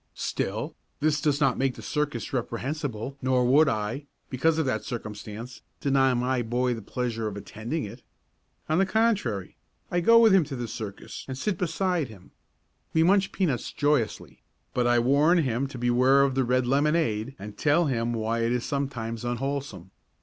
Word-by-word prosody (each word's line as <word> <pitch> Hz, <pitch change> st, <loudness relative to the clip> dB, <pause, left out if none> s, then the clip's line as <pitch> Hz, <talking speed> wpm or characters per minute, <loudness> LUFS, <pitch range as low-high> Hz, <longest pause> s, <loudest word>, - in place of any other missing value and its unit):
Still, -, -, -3 dB, 0.2 s
this 150 Hz, -1 st, +1 dB
does 145 Hz, -2 st, +1 dB
not 135 Hz, -, +2 dB
make 135 Hz, -1 st, +1 dB
the -, -, -10 dB
circus 150 Hz, -4 st, -2 dB
reprehensible 130 Hz, +1 st, -3 dB
nor 130 Hz, -1 st, +2 dB
would 145 Hz, +5 st, +5 dB
I, 115 Hz, +7 st, -3 dB, 0.2 s
because 155 Hz, +5 st, +2 dB
of 160 Hz, -, +1 dB
that 130 Hz, -, -1 dB
circumstance, 110 Hz, +1 st, -7 dB, 0.2 s
deny 135 Hz, -2 st, +3 dB
my 125 Hz, +1 st, 0 dB
boy 120 Hz, +2 st, 0 dB
the 115 Hz, -, -6 dB
pleasure 115 Hz, 0 st, -3 dB
of 105 Hz, -1 st, -5 dB
attending 115 Hz, +9 st, -4 dB
it. 115 Hz, +5 st, -10 dB, 0.7 s
On 155 Hz, +3 st, +2 dB
the 195 Hz, -, +4 dB
contrary, 195 Hz, -, 0 dB, 0.3 s
I 175 Hz, -, +2 dB
go 230 Hz, +7 st, +6 dB
with 225 Hz, -3 st, +7 dB
him 190 Hz, -3 st, +6 dB
to 140 Hz, -1 st, -6 dB
the 120 Hz, -2 st, -4 dB
circus 105 Hz, -2 st, -7 dB
and 130 Hz, -1 st, -5 dB
sit 195 Hz, +3 st, -2 dB
beside 180 Hz, -2 st, 0 dB
him. 105 Hz, -5 st, -15 dB, 0.6 s
We 160 Hz, -, +4 dB
munch 195 Hz, +2 st, +3 dB
peanuts 145 Hz, -, -1 dB
joyously, 145 Hz, -6 st, -1 dB, 0.3 s
but 125 Hz, -1 st, +1 dB
I 120 Hz, 0 st, +4 dB
warn 140 Hz, +8 st, +4 dB
him 135 Hz, -4 st, 0 dB
to 135 Hz, -, -9 dB
beware 125 Hz, +3 st, +4 dB
of 140 Hz, -1 st, +1 dB
the 130 Hz, 0 st, +1 dB
red 125 Hz, +1 st, +2 dB
lemonade 135 Hz, -3 st, +1 dB
and 105 Hz, +1 st, -9 dB
tell 150 Hz, +3 st, +3 dB
him 120 Hz, -4 st, 0 dB
why 115 Hz, 0 st, -1 dB
it 115 Hz, 0 st, +1 dB
is 125 Hz, -1 st, -1 dB
sometimes 120 Hz, -6 st, -3 dB
unwholesome. 120 Hz, -6 st, -3 dB
130 Hz, 175 wpm, -27 LUFS, 115-150 Hz, 0.7 s, with